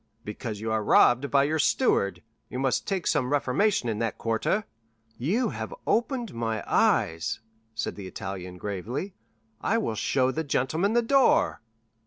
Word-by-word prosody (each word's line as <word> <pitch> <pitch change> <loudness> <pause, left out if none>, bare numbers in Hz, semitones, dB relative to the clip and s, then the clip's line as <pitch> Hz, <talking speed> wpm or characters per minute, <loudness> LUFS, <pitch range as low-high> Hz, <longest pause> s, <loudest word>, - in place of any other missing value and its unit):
"Because 105 0 -5
you 110 +1 -3
are 110 -1 0
robbed 125 +6 +4
by 140 -1 +4
your 155 +3 0
steward. 100 - +2 0.3
You - - -5
must 135 0 0
make 190 -3 -1
some 135 -3 +1
reformation 145 - +1
in 110 -2 -1
that 115 -2 -2
quarter." 115 - 0 0.6
"You 195 - +1
have - - -5
opened 240 -2 0
my 115 -2 -2
eyes," 80 +1 +1 0.4
said 115 - -3
the 100 -2 -7
Italian 90 -1 -6
gravely; 105 - -4 0.5
"I 225 - +1
will 215 - -1
show 130 +4 +1
the 160 +4 -2
gentlemen 160 - 0
the 240 0 +3
door." 270 +2 +3
130 Hz, 155 wpm, -27 LUFS, -, 0.6 s, robbed